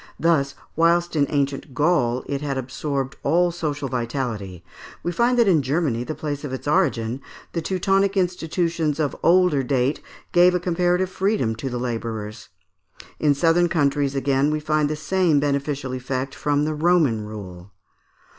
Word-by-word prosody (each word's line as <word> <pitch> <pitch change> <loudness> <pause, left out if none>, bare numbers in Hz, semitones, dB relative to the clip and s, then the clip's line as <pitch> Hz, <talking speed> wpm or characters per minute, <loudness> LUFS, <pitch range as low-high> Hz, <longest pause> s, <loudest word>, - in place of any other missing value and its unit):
Thus, 140 -5 +2 0.2
whilst 170 +1 +2
in 145 -2 +2
ancient 140 -1 -2
Gaul 130 -6 +2
it 140 0 -3
had 140 -2 -2
absorbed 135 +1 -3
all 175 +4 +2
social 150 -4 -3
vitality, 115 -7 -4 0.4
we 175 - -1
find 240 +7 +2
that 235 -3 +4
in 170 -6 +4
Germany, 135 -3 0
the 155 +5 -5
place 145 -1 -4
of 145 - -5
its 130 +1 -6
origin, 135 -7 +1 0.3
the 170 - -1
Teutonic 195 +3 +1
institutions 170 -3 0
of 150 -3 0
older 175 -4 +4
date 130 +1 0 0.3
gave 180 +1 +5
a - - +2
comparative 180 +1 0
freedom 190 - 0
to 135 +4 -4
the 125 - -3
labourers. 115 -4 -5 0.7
In 145 -2 +3
southern 170 +4 +3
countries 140 -3 +1
again 135 +1 +1
we 155 0 0
find 150 -1 +1
the 155 - -1
same 165 0 +2
beneficial 140 -2 -1
effect 130 +1 -3
from 145 0 0
the 155 - -1
Roman 155 -8 +2
rule. 100 -3 -9
145 Hz, 155 wpm, -23 LUFS, 130-170 Hz, 0.7 s, gave